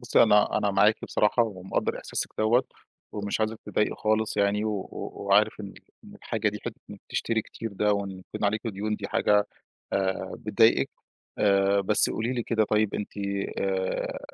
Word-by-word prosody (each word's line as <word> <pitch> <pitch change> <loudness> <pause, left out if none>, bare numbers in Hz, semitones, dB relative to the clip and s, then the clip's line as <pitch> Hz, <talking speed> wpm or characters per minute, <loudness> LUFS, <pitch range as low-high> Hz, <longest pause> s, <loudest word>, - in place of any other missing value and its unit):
بُصّي - - +4
أنا 105 0 +4
أنا 100 - +1
معاكِ 105 +2 +4
بصراحة 105 +3 +2
ومقدّر 95 -4 -2
إحساسِك - - -3
دوّة، 115 +4 +3 0.5
ومش 100 0 -3
عايزِك 110 0 -1
تتضايقي 105 - 0
خالص 110 0 0
يعني، 100 +1 +2
و 110 - 0 0.2
و - - -5 0.2
وعارف - - +3
إن - - -8 0.3
إن - - -13
الحاجة 110 -1 -2
دي 105 0 -5
حتّة 120 - -6
إن 105 - -8
بتشتري 115 -1 -1
كتير 115 0 -7
ده 105 +1 +2
وإن 100 -1 -2
يكون 95 +2 -7
عليكِ 105 +2 +1
ديون 105 0 -2
دي 100 - -6
حاجة 105 0 +3 0.5
آآ، 95 -1 -1
بتضايقِك - - +3 0.5
آآ، 100 0 +3
بس 105 +2 +3
قولي 115 +3 -2
لي 120 - -2
كده 110 -1 +1
طيب 105 0 +1
أنتِ 105 - -6
آآ، 100 -1 -2
105 Hz, 170 wpm, -27 LUFS, 100-110 Hz, 0.5 s, بُصّي